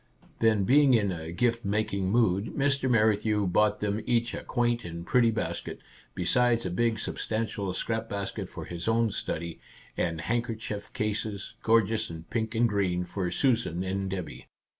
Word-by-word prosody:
" - - -24
Then, 110 -3 +3
being 135 +4 +5
in 100 -4 +2
a 80 -2 -5
gift 115 +5 +1
making 100 -2 0
mood, 105 -2 +2
Mr. 140 -1 +2
Merrithew 105 -2 +3
bought 105 +3 +2
them 105 +1 -1
each 120 -1 +1
a - - -5
quaint 120 -1 0
and 85 0 -7
pretty 120 +2 +4
basket, 110 -1 -3 0.4
besides 115 +5 +2
a 90 - -2
big 115 +4 +1
substantial 110 -2 -2
scrap 115 +4 -2
basket 100 -1 -4
for - - -7
his 85 +2 -5
own 115 0 +2
study, 85 -2 -4 0.4
and 85 -2 -1
handkerchief 115 -1 -3
cases, 105 -1 -3
gorgeous 115 -1 +2
in 80 -1 -7
pink 115 -1 -1
and 120 +1 +4
green, 95 -4 0
for 90 0 -3
Susan 115 - +1
and 95 +1 -2
Debby. 80 -10 -6
105 Hz, 160 wpm, -28 LUFS, 95-115 Hz, 0.4 s, being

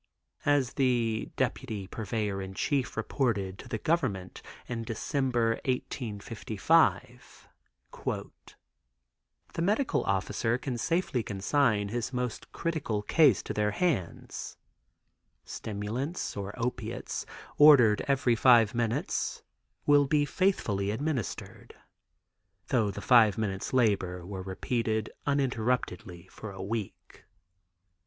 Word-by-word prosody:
As 145 -4 +3
the 120 -5 +1
deputy 120 -5 -2
purveyor 105 -1 -3
in 95 0 -7
chief 135 -3 -1
reported 105 -5 -1
to - - -10
the 110 - -2
Government 105 - -1 0.2
in 120 -2 -4
December, 120 0 0
1855: 125 +2 0 0.5
"The - - -9
medical 210 +10 +1
officer 100 +4 0
can 125 -2 -4
safely 165 -4 0
consign 105 +1 +1
his 120 +2 -3
most 125 -3 -4
critical 145 -11 -2
case 140 - +4
to - - -4
their 105 0 +1
hands; 150 - -2 0.9
stimulants 110 - -4
or 100 0 -5
opiates 125 0 -3 0.3
ordered 125 -8 +7
every 130 -3 +2
five 115 -3 +5
minutes 115 -1 -1 0.4
will 145 -1 +5
be 145 +1 +3
faithfully 115 - 0
administered, 130 - -4 0.9
though 115 -5 +2
the 100 - -6
five 115 -5 +5
minutes' 100 -3 -2
labor 95 -8 +1
were 95 0 -6
repeated 110 +3 -2 0.2
uninterruptedly 120 -9 -1
for 110 - -8
a 95 - -10
week." 105 0 -6
115 Hz, 105 wpm, -29 LUFS, 100-130 Hz, 0.9 s, ordered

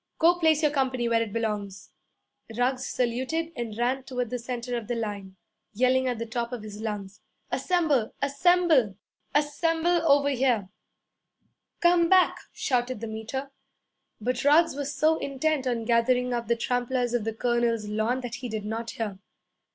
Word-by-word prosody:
'Go 345 +2 +4
place 315 -2 +3
your 300 - +4
company 260 -4 0
where 230 -1 +2
it 225 -2 -3
belongs.' 210 -3 -3 0.7
Ruggs 255 +1 0
saluted 260 +7 -1
and 225 -3 -5
ran 250 +3 0
toward 250 -3 -4
the 250 - -2
centre 245 0 -4
of 230 -3 -4
the 240 - -1
line, 205 -4 -5 0.4
yelling 255 +3 +3
at 245 -2 -1
the 230 - -3
top 235 +1 -3
of 240 -4 -5
his 210 0 -8
lungs, 210 -3 -5 0.3
'Assemble, 310 -11 +1
assemble, 285 - +3 0.4
ASSEMBLE 330 +3 +2
over 285 0 +4
here!' 245 -7 +1 1.1
'Come 345 -1 +4
back!' 370 -1 +4
shouted 250 -2 -1
the 230 - -5
Meter. 225 +5 -5 0.7
But 245 +3 -2
Ruggs 310 +4 +5
was 285 0 -3
so 310 +3 +2
intent 275 0 -1
on 235 -2 -1
gathering 245 +2 +2
up 235 -2 -2
the 235 - +2
tramplers 245 +1 -1
of 240 -3 +1
the 225 +1 -2
colonel's 235 -2 0
lawn 220 +5 0
that 245 -2 -6
he 250 - -4
did 215 -2 -4
not 225 +2 -4
hear. 210 -4 -4
245 Hz, 160 wpm, -27 LUFS, 230-280 Hz, 1.1 s, Ruggs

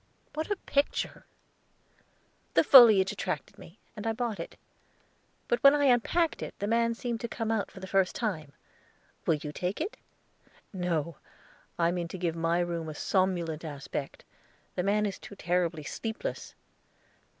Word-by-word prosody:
"What 315 +4 -3
a 410 - +1
picture!" 285 -6 -1 1.3
"The - - +6
foliage 220 -10 +8
attracted 180 -8 -4
me, 170 - -13 0.2
and 215 0 -5
I 225 - +1
bought 225 -4 -3
it; 165 - -7 0.9
but 240 - +1
when 280 +1 +8
I 290 - +2
unpacked 280 +6 +2
it, - - -6
the 205 - -3
man 230 +2 +2
seemed 235 -1 -3
to 235 - -2
come 225 -1 -3
out 220 -3 0
for - - -12
the 190 - -7
first 190 -1 +1
time. 160 - -3 0.8
Will 165 - +4
you 150 0 -6
take 180 +5 -3
it?" 355 +8 -3 0.8
"No; 170 -3 -2 0.6
I 170 0 +3
mean 175 -1 -2
to 180 - -7
give 170 -2 -1
my 165 +1 +1
room 170 -2 -3
a 155 - -7
somnolent 175 -3 0
aspect. 145 -2 -6 0.5
The - - -1
man 205 +3 +2
is 200 -2 -3
too 200 - -11
terribly 175 -3 0
sleepless." 220 +9 -5
190 Hz, 160 wpm, -29 LUFS, 170-230 Hz, 1.3 s, foliage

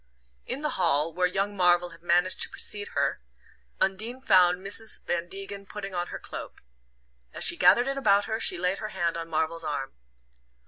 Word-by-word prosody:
In 275 - -3
the 300 - -2
hall, 150 +1 +2
where 180 +2 +2
young 195 +3 -2
Marvell 175 -1 +3
had 165 0 -14
managed 175 +2 +2
to - - +6
precede 205 -1 -2
her. - - 0 0.6
Undine 215 +7 -1
found 185 -7 +4
Mrs. 215 +2 -3
Van 175 0 -2
Degen 195 +1 -8
putting 195 -1 -7
on 175 0 -2
her - - -6
cloak. - - -8 0.7
As - - -2
she - - +4
gathered 245 +2 +5
it 275 0 -1
about 205 -5 +3
her 220 0 -2
she 180 - +2
laid 180 +2 -1
her 215 - -4
hand 175 -5 -1
on 165 0 -5
Marvell's 160 +1 -1
arm. 140 -3 -4
185 Hz, 185 wpm, -27 LUFS, 175-205 Hz, 0.7 s, to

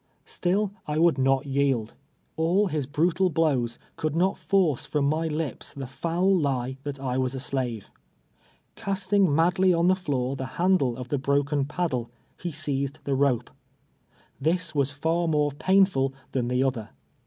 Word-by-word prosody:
iStill 195 +3 0 0.2
I 150 0 -1
would 165 -4 +3
not 135 +1 +2
yield. 135 -5 0 0.4
All 175 +6 +2
his 150 -5 -2
brutal 170 +5 +1
blows 140 -8 +1 0.2
could 155 -1 -2
not 185 +3 +2
force 180 -10 +1
from 145 -2 -1
my 160 +2 0
li})s 155 -1 -4
the 135 -1 -5
foul 170 +8 0
lie 130 -3 -1
that 140 -1 -5
I 130 -1 -2
was 130 +1 -1
a - - -3
slave. 125 -5 -2 0.8
Casting 195 -3 +1
mad 170 +3 +2
ly 185 -1 +5
on 170 +1 +3
the 185 - +5
floor 135 -8 -2
the 130 -1 -4
handle 170 -9 +2
of 125 -1 -7
the 145 - 0
broken 140 +1 +1
paddle, 140 -6 -2 0.3
ho 175 - -2
seized 140 -2 -2
the 140 - -1
rope. 135 -3 +1 0.9
This 175 +2 +1
was 140 -2 +2
far 165 +4 -1
more 150 -2 +2
painful 155 -4 +2 0.2
than 125 -3 -1
the 125 +1 +1
other. 125 -5 -2
145 Hz, 165 wpm, -26 LUFS, 135-170 Hz, 0.9 s, ly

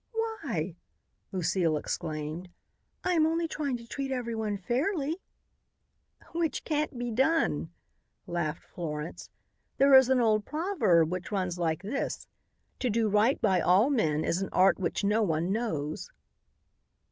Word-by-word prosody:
"Why?" 285 - -3 0.5
Lucile 175 -3 +1
exclaimed. 155 +2 -4 0.5
"I 365 - +1
am 315 -2 +4
only 330 +1 0
trying 290 -5 -2
to 235 0 -13
treat 275 +2 -4
everyone 225 -5 -2
fairly." 290 - -1 1.1
"Which 330 -1 -1
can't 300 -4 -1
be 240 0 -3
done," 265 - +1 0.6
laughed 165 -3 -3
Florence. 150 -2 -6 0.5
"There 275 0 +5
is 265 -1 +8
an 260 -1 +4
old 215 -3 +3
proverb 300 - +2
which 185 +2 -4
runs 185 -3 -1
like 165 0 -1
this: 250 +8 -3 0.5
'To 250 - 0
do 225 0 +1
right 210 +6 +3
by 185 -2 +3
all 195 - +4
men 155 - +1
is 175 - 0
an 195 - -2
art 190 +2 +4
which 185 +2 -1
no 210 +3 +2
one 170 -2 0
knows.'" 195 - -2
215 Hz, 135 wpm, -29 LUFS, 175-275 Hz, 1.1 s, is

